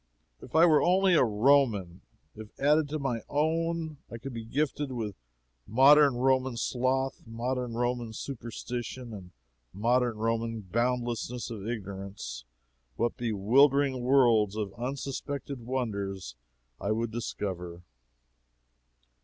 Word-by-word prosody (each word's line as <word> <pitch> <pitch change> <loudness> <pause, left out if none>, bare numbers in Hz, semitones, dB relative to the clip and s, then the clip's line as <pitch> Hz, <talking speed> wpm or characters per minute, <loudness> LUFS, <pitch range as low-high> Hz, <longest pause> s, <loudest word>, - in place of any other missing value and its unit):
But - - -11
if - - -12
I 165 +2 +7
were 155 -3 +5
only 185 +1 +4
a 165 - +6
Roman! 110 -6 +2 0.3
If, 110 0 -12
added 150 +1 +3
to 155 - -2
my 135 -6 -2
own 160 +1 0
I 115 - -7
could 130 +3 -7
be 115 -1 -5
gifted 140 +3 -1
with 110 -5 -3 0.5
modern 140 +3 +6
Roman 130 0 +1
sloth, 130 +2 0
modern 120 +1 -3
Roman 120 -1 -1
superstition, 120 0 -6
and 95 -4 -9 0.5
modern 120 +2 +1
Roman 115 0 -1
boundlessness 120 +3 -2
of 105 -2 -6
ignorance, 95 - -6 0.5
what 120 0 0
bewildering 130 +5 +3
worlds 120 -6 +4
of 105 -3 -3
unsuspected 135 +2 -4
wonders 100 - -3 0.5
I 100 - -3
would 115 +1 -1
discover! 90 -6 -5
120 Hz, 120 wpm, -29 LUFS, 110-135 Hz, 0.5 s, I